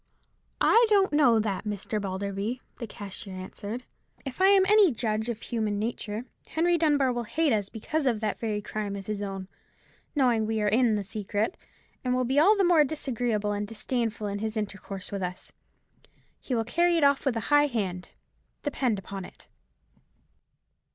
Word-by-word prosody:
"I 465 +1 +5
don't 395 -5 +4
know 270 -6 +5
that, 210 -3 -1
Mr. 210 0 -3
Balderby," 200 +4 -3 0.2
the 235 - -5
cashier 195 -2 -7
answered; 205 +5 -6 0.4
"if 270 +6 -5
I 380 - +7
am 390 -1 +6
any 410 -3 +6
judge 220 -1 -1
of 230 -2 -3
human 215 -3 -1
nature, 220 +1 -3 0.2
Henry 345 +2 +2
Dunbar 290 -6 +3
will 240 -1 -3
hate 305 +3 +1
us 205 -2 0
because 285 +6 -2
of 235 -4 +1
that 215 -1 -2
very 210 -2 -2
crime 205 -1 -4
of 195 -1 -7
his 210 0 -3
own, 195 -2 -5 0.7
knowing 250 -5 +3
that 215 - -1
we 220 0 0
are 210 - +1
in 225 +1 +3
the 205 - -1
secret, 210 - -2 0.5
and 250 0 +1
will 255 0 +1
be 265 +4 +2
all 405 +7 +6
the 395 - +3
more 345 -4 +6
disagreeable 245 -7 -1
and 205 0 -2
disdainful 225 0 -2
in 200 0 -3
his 220 +1 -3
intercourse 200 -2 -5
with 200 -1 -3
us. 180 0 -5 0.9
He 255 - -3
will 225 -1 0
carry 340 +8 +2
it 320 - +2
off 280 -1 +4
with 265 -5 0
a 225 +6 -2
high 290 0 +6
hand, 190 -8 -3 0.5
depend 260 -6 0
upon 195 0 -6
it." - - -14
225 Hz, 180 wpm, -27 LUFS, 205-275 Hz, 0.9 s, I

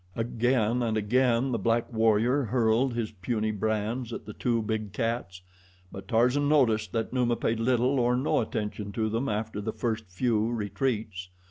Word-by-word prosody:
Again 120 0 +1
and 110 -2 0
again 125 +3 +2
the 115 - -1
black 115 +3 0
warrior 115 +4 +3
hurled 120 +2 +1
his 115 -2 -2
puny 110 +2 -2
brands 110 +3 -2
at 115 - -6
the 105 - -8
two 115 0 0
big 110 -2 -3
cats; 115 -6 -3 0.5
but 95 - -9
Tarzan 125 +5 +2
noticed 110 -9 +3
that 115 +1 -2
Numa 120 -2 +2
paid 115 -1 -1
little 125 +3 +2
or 120 0 +2
no 130 - +1
attention 105 -2 -4
to 110 +2 0
them 115 +5 -1
after 105 0 -3
the 110 +2 -3
first 115 -2 -2
few 110 +3 0
retreats. 105 -3 -2
115 Hz, 165 wpm, -28 LUFS, 110-125 Hz, 0.5 s, warrior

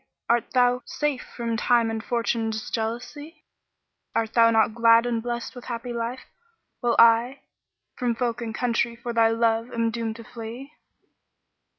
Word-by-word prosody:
art 235 0 +1
thou 250 0 +3
safe 295 -2 -2
from 230 -1 -4
Time 230 0 +2
and 225 0 -4
Fortune's 230 -1 -2
jealousy? 250 +8 -5 0.7
Art 225 -1 0
thou 230 0 +6
not 225 -1 +3
glad 230 0 +5
and 235 -2 -1
blest 240 0 -4
with 245 - -11
happy 240 0 -5
life, 235 +2 -3 0.6
while 240 -2 +1
I 235 +4 +5 0.3
* - - -56
From 245 -2 0
folk 240 -1 -2
and 225 -2 -5
country 235 0 0
for 235 0 -6
thy 230 -1 +4
love 230 +1 +1
am 230 -1 0
doomed 230 0 -4
flee?" 235 +5 -8
235 Hz, 155 wpm, -25 LUFS, 230-245 Hz, 0.7 s, thou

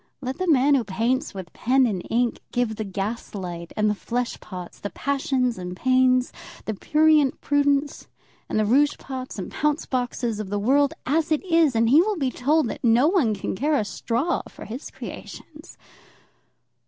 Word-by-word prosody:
Let 260 0 -5
the 370 - -1
man 285 -2 +4
who 265 -4 +3
paints 230 +7 -1
with 185 -3 -8
pen 260 +2 +3
and 200 -6 -1
ink 240 0 +1
give 245 -3 0
the 220 - -2
gas 205 +3 -4
light, 175 -3 -6
and 215 0 +2
the 210 - +2
flesh 240 +3 -3
pots, 180 -3 -9
the 205 - -4
passions 265 -5 -1
and 180 0 -6
pains, 255 0 +3 0.3
the 220 - -2
prurient 305 +4 +3
prudence 285 0 +1 0.4
and - - -1
the 215 - +2
rouge 285 +7 +3
pots 260 -3 -7
and 190 - -5
pounce 300 +1 0
boxes 245 -3 -2
of 210 -3 -5
the 205 - -1
world 275 +7 +2
as 320 +4 0
it 310 +4 +1
is, 330 -7 +3
and 230 0 +3
he 285 +7 +6
will 420 +1 0
be 270 -5 0
told 295 +3 +1
that - - -7
no 240 +4 +5
one 290 - +2
can 195 - -4
care 295 +8 +1
a 215 - 0
straw 245 +10 -1
for - - -11
his 245 +6 -7
creations. 305 +2 -10
255 Hz, 185 wpm, -24 LUFS, 215-285 Hz, 0.4 s, he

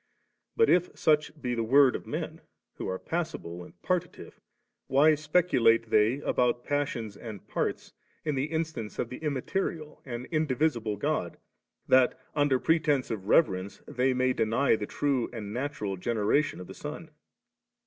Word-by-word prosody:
But 455 - +4
if 180 0 +2
such 155 0 +2
be 125 -4 -2
the 115 - -1
word 130 +3 +5
of - - -6
men, - - -4 0.4
who - - -4
are 95 - -2
passible 155 - -4
and - - -16
partitive, 180 -1 -3 0.5
why 145 +4 +5
speculate 145 -8 +2
they 110 +6 +3
about 120 -2 +1
passions 130 -7 -2
and 110 -2 -9
parts - - -3 0.3
in 150 - 0
the 135 0 0
instance 155 -8 -4
of 120 - -2
the 125 - -6
immaterial 155 +2 -3
and 120 -2 -6
indivisible 140 -8 0
God, - - -2 0.5
that 130 -1 +4
under 145 -3 +3
pretence 155 -5 +1
of 100 -3 -5
reverence' 95 - +2
they 130 +2 +1
may 130 0 +2
deny 115 +4 +2
the 105 -1 -4
true 135 -5 0
and 105 -4 -6
natural 120 -7 -3
generation 115 +8 0
of 90 - -7
the - - -10
Son - - -8
130 Hz, 150 wpm, -28 LUFS, 115-150 Hz, 0.5 s, word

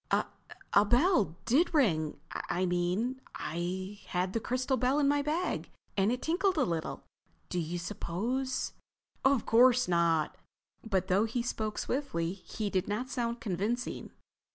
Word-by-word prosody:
"A—a 200 - 0
bell 240 - +3
did 310 +9 +3
ring. 160 - +2
I 185 +1 -1
mean, 180 +9 0
I 185 +4 -4
had 180 +1 -1
the 230 - +1
crystal 255 +3 0
bell 255 +3 +2
in 290 -2 +3
my 290 0 +3
bag 315 +5 -1 0.3
and 195 +2 +3
it 250 - -2
tinkled 365 +3 +1
a 295 - +4
little. 165 -4 -3 0.5
Do 180 - -1
you 170 +1 -2
suppose—" 225 +9 -2 0.5
"Of 270 -3 +3
course 250 +2 +5
not." 170 -3 +2 0.5
But 195 -5 0
though 195 +3 +3
he 235 +2 -2
spoke 220 -3 -2
swiftly 185 -11 -1
he 200 +2 -5
did 185 -2 0
not 245 +6 -2
sound 235 -2 -2
convincing. 220 +4 -2
220 Hz, 145 wpm, -31 LUFS, 180-255 Hz, 0.5 s, course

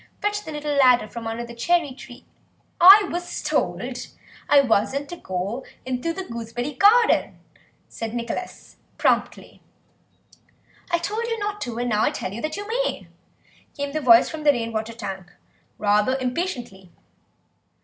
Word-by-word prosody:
Fetch 415 0 -2
the 315 - -6
little 295 -1 -3
ladder 250 -5 +5
from 230 +1 -7
under 230 +1 -4
the 235 - -10
cherry 315 +5 +1
tree—" 250 -1 -13 0.5
"I 390 +3 +9
was 350 +1 -4
told - - -1 0.7
I 290 - +7
wasn't 270 +3 0
to 350 - -6
go 195 - -4 0.2
into 255 +5 -2
the 380 +3 -5
gooseberry 235 +1 -5
garden," 435 - +4 0.5
said 225 0 -6
Nicholas 235 +9 -6 0.2
promptly. - - -1 1.3
"I 340 - +2
told 420 +7 -3
you 460 -1 -2
not 415 -1 -4
to, 240 -2 -4
and 245 0 -1
now 210 0 +2
I - - +3
tell 185 - -5
you 230 - -6
that 310 +3 -3
you 410 0 -6
may," - - -2 0.7
came 285 0 -3
the 310 +1 -2
voice 235 -3 +6
from 315 - -6
the 295 - +6
rain 230 -4 -3
water 220 +1 -3
tank, 195 -5 -7 0.5
rather 210 +5 +2
impatiently. 250 - -4
260 Hz, 155 wpm, -23 LUFS, 230-345 Hz, 1.3 s, I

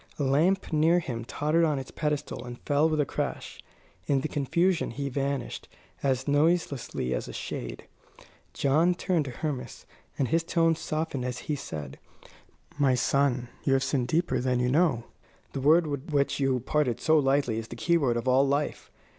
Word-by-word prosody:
A 145 - -1
lamp 165 +8 +2
near 160 +3 +4
him 120 -9 -3
tottered 150 +7 +1
on 155 -3 +2
its 135 - -6
pedestal 150 -1 -2
and 120 -1 -8
fell 145 +2 +2
with 155 -1 0
a 145 - +3
crash. - - -4 0.5
In 140 -2 +2
the 155 - -2
confusion 170 +5 +1
he 140 +3 -4
vanished, 140 +1 -3 0.3
as 130 -1 0
noiselessly 145 - +1
as - - -3
a - - -8
shade. - - -5 0.7
John 160 +6 +2
turned 175 -4 0
to - - -5
Hermas, 135 0 -5 0.3
and 135 - 0
his 165 +1 +2
tone 165 -1 +2
softened 155 -4 -3
as 125 0 -3
he 150 - -1
said: 75 - -7 0.8
"My 135 -3 +4
son, 125 -1 +1
you 135 - +2
have 135 0 +2
sinned 130 -3 0
deeper 170 +6 +1
than 125 0 0
you 125 0 +1
know. 150 -6 +2 0.5
The 135 - -3
word 160 +5 +5
with 145 +2 -4
which 140 -1 +1
you 135 -2 +1
parted 130 -2 0
so 160 0 +4
lightly 135 -5 +1
is 115 - -7
the 120 - -8
keyword 140 -4 +2
of 120 +2 -3
all 130 +2 +4
life. 145 +2 -1
140 Hz, 180 wpm, -28 LUFS, 130-155 Hz, 0.8 s, word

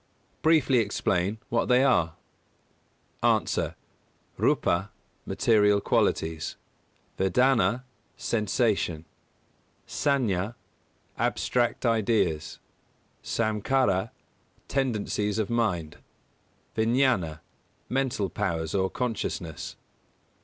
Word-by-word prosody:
Briefly 155 -5 +4
explain 100 -2 0
what 115 - +1
they 125 +1 +4
are? 85 -12 +2 1.1
A. - - +4 1.0
__Rūpa_, 95 +4 +2 0.4
material 105 -2 +3
qualities; 80 -4 0 0.6
Vedanā, 125 +5 +3 0.3
sensation; 105 -7 0 0.8
Saññā, 115 -7 0 0.6
abstract 120 0 0
ideas; 110 -9 +1 0.7
Samkhārā, 110 -2 +1 0.6
tendencies 105 -6 -1
of 110 0 -1
mind; 90 -10 -1 0.8
Viññāna, 110 - +1 0.5
mental 130 -6 -1
powers, 80 -3 -2
or 95 -1 +1
consciousness. 110 - -4
110 Hz, 70 wpm, -27 LUFS, 95-125 Hz, 1.1 s, Briefly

